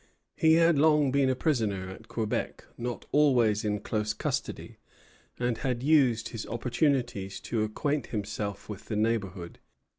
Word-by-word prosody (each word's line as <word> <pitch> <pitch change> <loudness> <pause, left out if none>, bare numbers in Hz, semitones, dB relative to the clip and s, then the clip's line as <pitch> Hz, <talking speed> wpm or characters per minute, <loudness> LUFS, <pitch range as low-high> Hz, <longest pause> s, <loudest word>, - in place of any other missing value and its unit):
He 160 -2 +4
had 165 -2 +4
long 150 -2 +4
been 140 -1 +3
a 130 - +1
prisoner 110 - 0
at 110 +4 -12
Quebec, 110 -2 -3
not 120 0 -5
always 120 -8 +3
in 105 -1 -1
close 105 0 -1
custody, - - -4 0.6
and 120 -2 -1
had 125 -2 -2
used 135 -7 +3
his 115 -2 -6
opportunities 120 -4 -1
to 115 - -2
acquaint 140 +7 -1
himself 105 -1 -4
with 105 0 -8
the 110 - -4
neighborhood. 100 -5 -2
115 Hz, 145 wpm, -28 LUFS, 105-140 Hz, 0.6 s, He